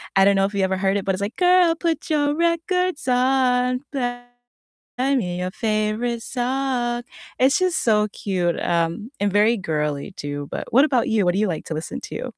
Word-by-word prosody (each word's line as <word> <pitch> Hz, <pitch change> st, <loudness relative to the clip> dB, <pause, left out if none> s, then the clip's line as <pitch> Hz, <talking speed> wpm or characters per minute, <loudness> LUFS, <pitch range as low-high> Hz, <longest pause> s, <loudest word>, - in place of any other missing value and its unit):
I 195 Hz, -, +6 dB
don't 200 Hz, 0 st, +4 dB
know 195 Hz, -, +3 dB
if 200 Hz, -, -4 dB
you 195 Hz, -, +1 dB
ever 190 Hz, 0 st, 0 dB
heard 195 Hz, +1 st, +1 dB
it, 195 Hz, -, -4 dB
but 195 Hz, -, +1 dB
it's 190 Hz, -, -4 dB
like, 205 Hz, +3 st, -3 dB
"Girl, 360 Hz, -2 st, +4 dB
put 330 Hz, 0 st, -2 dB
your 290 Hz, -1 st, +2 dB
records 340 Hz, 0 st, 0 dB
on, 250 Hz, 0 st, +2 dB
play 245 Hz, -3 st, -3 dB, 0.9 s
me 180 Hz, -7 st, -2 dB
your 180 Hz, -, -2 dB
favorite 215 Hz, +3 st, -1 dB
song." 245 Hz, -1 st, -1 dB, 0.4 s
It's 265 Hz, +2 st, +4 dB
just 370 Hz, -2 st, 0 dB
so 210 Hz, -2 st, +3 dB
cute, 185 Hz, -4 st, -2 dB
um, 170 Hz, +6 st, -1 dB
and 205 Hz, -1 st, +1 dB
very 215 Hz, +3 st, +4 dB
girly 150 Hz, -2 st, -3 dB
too, 145 Hz, -3 st, -6 dB
but -, -, -5 dB
what 270 Hz, +5 st, +6 dB
about 255 Hz, -6 st, +1 dB
you? 220 Hz, -3 st, +2 dB
What 175 Hz, -, +3 dB
do 200 Hz, -, +1 dB
you 215 Hz, -, +1 dB
like 160 Hz, -3 st, -4 dB
to 160 Hz, -, -4 dB
listen 155 Hz, +1 st, -5 dB
to? -, -, -6 dB
225 Hz, 200 wpm, -22 LUFS, 190-265 Hz, 0.9 s, I